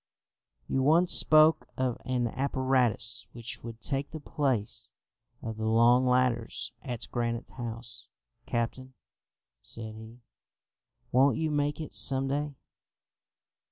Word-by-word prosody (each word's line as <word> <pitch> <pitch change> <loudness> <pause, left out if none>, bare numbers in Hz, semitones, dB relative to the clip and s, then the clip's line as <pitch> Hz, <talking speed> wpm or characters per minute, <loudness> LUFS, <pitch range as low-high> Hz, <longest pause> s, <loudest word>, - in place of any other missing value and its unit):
"You 135 - 0
once 165 +6 +4
spoke 155 +1 +5
of 130 -2 -1
an 125 -2 0
apparatus 130 -4 0
which 120 0 -7
would 115 -1 -8
take 135 +4 -2
the 160 - -7
place 130 -7 -2 0.5
of 110 -1 -5
the 110 0 -2
long 120 +3 +5
ladders 125 -2 +1
at 120 -4 -6
Granite 115 -1 -2
House, 115 -1 -6 0.4
captain," 130 +2 -3 0.7
said 110 -1 -4
he; 110 +2 -12 0.9
"won't 135 +2 +4
you 160 -1 -1
make 145 0 0
it 155 - -6
some 135 -1 +3
day?" 145 +1 -2
125 Hz, 120 wpm, -29 LUFS, 115-140 Hz, 0.9 s, spoke